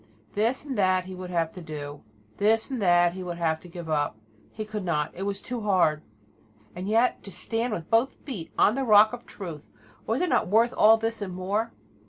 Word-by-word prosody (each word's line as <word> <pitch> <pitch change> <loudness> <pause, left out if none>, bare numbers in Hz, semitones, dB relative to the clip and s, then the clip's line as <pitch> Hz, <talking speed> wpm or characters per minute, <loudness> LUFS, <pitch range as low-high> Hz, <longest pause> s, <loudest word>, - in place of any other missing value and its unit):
This 230 +7 0
and 275 -3 -4
that 185 -1 +3
he 190 - -8
would 185 0 -7
have 165 -2 0
to 180 - -10
do; 145 -3 -7 0.4
this 220 +4 +2
and 255 -4 -2
that 175 -2 +4
he 185 - -6
would 175 -1 -5
have 160 -2 0
to 180 - -14
give 175 -1 -8
up 145 -7 0 0.3
he 215 - -5
could 210 -1 -5
not: 155 -3 0
it 195 +2 -4
was 200 0 -2
too 245 +1 -5
hard. 180 -7 +2 0.7
And 180 +2 -5
yet 230 +4 +2
to - - -9
stand 225 +6 -2
with 170 -6 -5
both 230 +4 +3
feet 210 - -6
on 210 - +5
the 270 +2 -1
rock 215 -1 +6
of 245 0 -8
truth, 165 -7 -8 0.4
was 225 +4 0
it 360 - +1
not - - +2
worth 225 +5 +3
all 220 +1 +7
this 225 0 -3
and 185 -3 -4
more? 200 +5 -1
195 Hz, 220 wpm, -26 LUFS, 175-225 Hz, 0.7 s, all